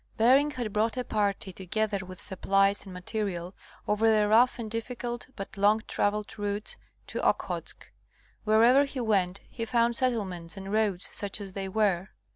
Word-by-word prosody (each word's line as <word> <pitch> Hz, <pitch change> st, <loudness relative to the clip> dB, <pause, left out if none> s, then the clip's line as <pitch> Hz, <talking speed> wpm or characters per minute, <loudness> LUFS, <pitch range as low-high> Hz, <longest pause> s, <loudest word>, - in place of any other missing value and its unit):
Bering 265 Hz, +6 st, +5 dB
had 245 Hz, -7 st, -4 dB
brought 220 Hz, +3 st, +1 dB
a 250 Hz, -, 0 dB
party, 200 Hz, -4 st, -1 dB
together 200 Hz, +3 st, -1 dB
with 185 Hz, -1 st, -10 dB
supplies 195 Hz, +1 st, +1 dB
and 195 Hz, -, -9 dB
ma 180 Hz, -, -7 dB
terial, 185 Hz, -3 st, -3 dB, 0.3 s
over 220 Hz, +2 st, +3 dB
the 210 Hz, -1 st, +3 dB
rough 235 Hz, +4 st, +5 dB
and 225 Hz, -3 st, -6 dB
difficult 240 Hz, +1 st, -4 dB
but 195 Hz, 0 st, -7 dB
long 210 Hz, +2 st, +3 dB
traveled 210 Hz, +1 st, -1 dB
routes 205 Hz, +1 st, -3 dB, 0.3 s
to -, -, -4 dB
Okhotsk. -, -, -1 dB, 0.6 s
Wherever 235 Hz, +6 st, +5 dB
he 275 Hz, -1 st, -6 dB
went 195 Hz, -5 st, +1 dB
he 230 Hz, -, -6 dB
found 235 Hz, 0 st, +2 dB
settlements 200 Hz, -9 st, -1 dB
and 195 Hz, +1 st, -6 dB
roads 210 Hz, -4 st, +1 dB
such 205 Hz, 0 st, -3 dB
as 195 Hz, -2 st, -7 dB
they 195 Hz, 0 st, -4 dB
were. 195 Hz, -3 st, +1 dB
210 Hz, 165 wpm, -28 LUFS, 195-230 Hz, 0.6 s, Bering